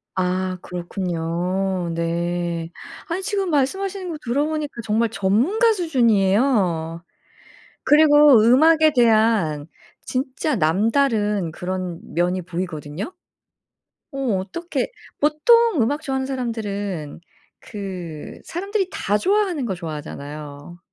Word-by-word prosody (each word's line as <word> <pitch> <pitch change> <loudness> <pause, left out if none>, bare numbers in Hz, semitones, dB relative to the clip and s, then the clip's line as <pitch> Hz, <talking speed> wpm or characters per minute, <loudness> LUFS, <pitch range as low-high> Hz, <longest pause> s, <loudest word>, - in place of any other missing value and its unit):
아 185 0 -1
그렇군요. 180 +1 -2
네. 170 0 -2 0.4
아니 365 +3 -3
지금 395 -3 -1
말씀하시는 370 +6 -1
거 315 - -4
들어보니까 295 +4 -1
정말 225 +1 +1
전문가 255 - +2
수준이에요. 205 - +1 0.8
그리고 295 -5 +6
음악에 310 +7 +5
대한 215 -10 +3 0.3
진짜 260 +2 -2
남다른 210 - +1
그런 180 0 -4 0.2
면이 180 +2 +1
보이거든요. 170 - -5 1.0
어 275 - -7 0.2
어떻게 340 - -4 0.3
보통 350 - +4
음악 290 +7 0
좋아하는 265 -3 -2
사람들은 205 - -4 0.4
그 180 -7 -7
사람들이 390 +2 -2
다 205 +1 0
좋아하는 370 - +1
거 195 - -2
좋아하잖아요. 150 -1 -8
210 Hz, 245 characters per minute, -22 LUFS, -, 1.0 s, 그리고